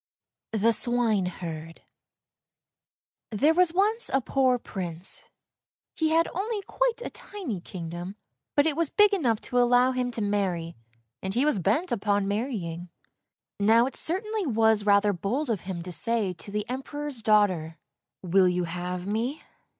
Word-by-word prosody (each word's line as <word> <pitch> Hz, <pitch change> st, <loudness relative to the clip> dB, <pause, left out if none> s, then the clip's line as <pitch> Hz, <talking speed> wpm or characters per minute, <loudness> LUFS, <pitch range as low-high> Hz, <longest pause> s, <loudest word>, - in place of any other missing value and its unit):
THE 225 Hz, +2 st, +3 dB
SWINEHERD 185 Hz, -9 st, -1 dB, 1.5 s
THERE 280 Hz, +9 st, +3 dB
was 360 Hz, 0 st, +4 dB
once 420 Hz, +6 st, +1 dB
a 270 Hz, -, +3 dB
poor 260 Hz, -1 st, +2 dB
Prince; 180 Hz, -6 st, -5 dB, 0.7 s
he 320 Hz, -1 st, +1 dB
had 330 Hz, +1 st, +3 dB
only 410 Hz, +3 st, -2 dB
quite -, -, -1 dB
a -, -, -5 dB
tiny 325 Hz, -, -6 dB
kingdom, 175 Hz, +2 st, -7 dB, 0.4 s
but 285 Hz, -, +4 dB
it 315 Hz, -3 st, +1 dB
was 330 Hz, -2 st, 0 dB
big 415 Hz, 0 st, +4 dB
enough 245 Hz, -, +1 dB
to 245 Hz, -, 0 dB
allow 245 Hz, +1 st, +4 dB
him 250 Hz, -1 st, -1 dB
to 235 Hz, -2 st, -3 dB
marry, 185 Hz, -5 st, -1 dB, 0.5 s
and 190 Hz, 0 st, -4 dB
he 255 Hz, +4 st, +2 dB
was 300 Hz, -10 st, +2 dB
bent 225 Hz, -, +1 dB
upon 205 Hz, -3 st, +1 dB
marrying. 195 Hz, -6 st, -3 dB, 0.7 s
Now, 225 Hz, +4 st, +5 dB
it 265 Hz, -, -5 dB
certainly 415 Hz, +3 st, 0 dB
was 220 Hz, -3 st, +2 dB
rather 205 Hz, 0 st, +4 dB
bold 235 Hz, -, -2 dB
of 210 Hz, -, -1 dB
him 170 Hz, -3 st, -4 dB
to 180 Hz, -, -7 dB
say 205 Hz, +3 st, 0 dB
to 180 Hz, -, -9 dB
the 210 Hz, +1 st, -3 dB
Em 255 Hz, +2 st, -3 dB
peror's 290 Hz, -3 st, -4 dB
daughter, 185 Hz, -7 st, +2 dB, 0.5 s
"Will 185 Hz, +1 st, +4 dB
you 180 Hz, 0 st, +1 dB
have 180 Hz, +1 st, -4 dB
me?" 230 Hz, +8 st, -2 dB
220 Hz, 150 wpm, -27 LUFS, 185-280 Hz, 1.5 s, Now